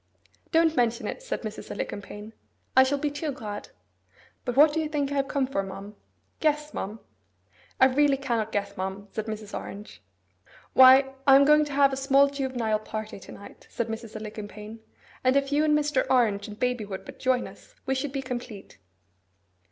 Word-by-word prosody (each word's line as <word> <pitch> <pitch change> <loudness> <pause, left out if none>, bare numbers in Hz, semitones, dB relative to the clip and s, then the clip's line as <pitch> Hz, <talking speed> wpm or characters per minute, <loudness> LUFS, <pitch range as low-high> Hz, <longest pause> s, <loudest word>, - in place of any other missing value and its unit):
'Don't 325 -1 +3
mention 235 -3 +1
it,' - - -5
said - - -4
Mrs. 215 -1 -7
Alicumpaine. 205 +2 -6 0.4
'I 260 - +8
shall 275 +2 0
be 290 +1 -1
too 290 +1 -3
glad. 215 -6 -7 0.8
But 245 -2 -2
what 295 +1 +7
do 320 - 0
you 310 -1 -2
think 285 -2 -1
I - - -2
have 275 -1 +1
come 275 -2 0
for, 255 -7 -1
ma'am? 195 +2 -8 0.4
Guess, 300 -1 0
ma'am.' 210 +3 -5 0.8
'I - - +8
really 275 +1 +3
cannot 235 -5 -2
guess, 200 -1 -2
ma'am,' 190 +2 -5
said 220 0 -4
Mrs. 215 -1 -6
Orange. 205 +2 -8 0.7
'Why, 265 +1 +7
I 270 - +9
am 280 +1 +7
going 300 +1 +5
to 290 - -7
have 275 -1 +4
a - - 0
small 275 +1 +4
juvenile 250 -6 -1
party 215 -1 -6
to - - -12
night,' 200 - -13
said 235 -1 -3
Mrs. 225 0 -6
Alicumpaine; 215 0 -8 0.4
'and 255 +1 +3
if 275 0 +1
you 295 +1 +3
and 300 -1 +4
Mr. 295 -3 +1
Orange 220 -6 +2
and 210 0 -10
baby 250 -2 0
would 190 -2 -7
but - - -11
join 255 -1 +1
us, - - -16
we 265 - 0
should 265 +1 -2
be 275 -1 -3
complete. 240 - -7
255 Hz, 190 wpm, -26 LUFS, 215-280 Hz, 0.8 s, I